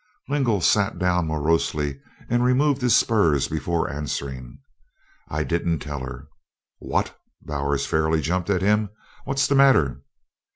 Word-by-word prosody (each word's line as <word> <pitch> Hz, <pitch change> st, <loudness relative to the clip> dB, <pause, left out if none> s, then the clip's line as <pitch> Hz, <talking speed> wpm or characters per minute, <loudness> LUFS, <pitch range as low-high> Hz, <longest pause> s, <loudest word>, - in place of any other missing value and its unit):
Lingle 130 Hz, -9 st, +1 dB
sat 100 Hz, +3 st, +2 dB
down 90 Hz, -2 st, +1 dB
morosely 75 Hz, -2 st, -1 dB, 0.3 s
and 120 Hz, +1 st, +1 dB
removed 135 Hz, +2 st, +2 dB
his 125 Hz, -1 st, +4 dB
spurs 80 Hz, -, +3 dB
before 80 Hz, +1 st, -1 dB
answering. 70 Hz, -3 st, -5 dB, 0.7 s
"I 75 Hz, +1 st, -1 dB
didn't 85 Hz, 0 st, -1 dB
tell 75 Hz, -2 st, -6 dB
her." 65 Hz, -1 st, -8 dB, 0.5 s
"What!" -, -, -2 dB, 0.3 s
Bowers 70 Hz, -1 st, -2 dB
fairly 80 Hz, 0 st, +1 dB
jumped 90 Hz, +4 st, -2 dB
at 95 Hz, -2 st, +1 dB
him. 105 Hz, +1 st, +2 dB, 0.4 s
"What's 135 Hz, +1 st, +1 dB
the -, -, +1 dB
matter?" 80 Hz, -, +4 dB
85 Hz, 130 wpm, -23 LUFS, 75-110 Hz, 0.7 s, his